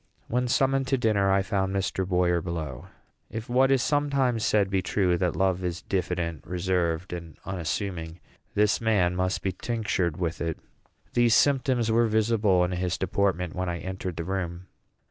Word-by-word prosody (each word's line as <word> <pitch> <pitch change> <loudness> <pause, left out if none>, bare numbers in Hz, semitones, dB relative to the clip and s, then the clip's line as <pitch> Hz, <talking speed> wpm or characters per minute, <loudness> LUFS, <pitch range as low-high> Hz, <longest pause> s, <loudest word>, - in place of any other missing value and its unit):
When 125 +1 0
summoned 135 +1 +2
to 135 - +2
dinner, 105 -5 +2
I 95 0 +3
found 95 0 -1
Mr. 95 -1 -1
Boyer 90 -2 +2
below. 80 -7 -5 0.4
If 110 0 -6
what 130 +2 +3
is 135 -2 +3
sometimes 140 -6 +1
said 100 -3 +2
be 95 -1 +2
true, 90 -2 +1
that 90 -2 0
love 95 -1 +1
is 85 -4 -3
diffident, 85 -4 -2
reserved, 90 -1 -1
and 85 -2 -8
unassuming, 90 -2 -3 0.4
this 105 -2 +3
man 100 -6 +2
must 95 +1 -1
be 95 - 0
tinctured 95 -5 -1
with 85 -2 -2
it. 80 -2 -2 0.6
These 120 -1 +4
symptoms 130 -4 +2
were 115 +1 +4
visible 110 -4 +2
in 90 - -1
his 90 0 -1
deportment 95 -3 0
when 90 0 -2
I 85 - -2
entered 95 0 -5
the 85 - -3
room. 90 -1 -3
95 Hz, 165 wpm, -27 LUFS, 90-110 Hz, 0.6 s, These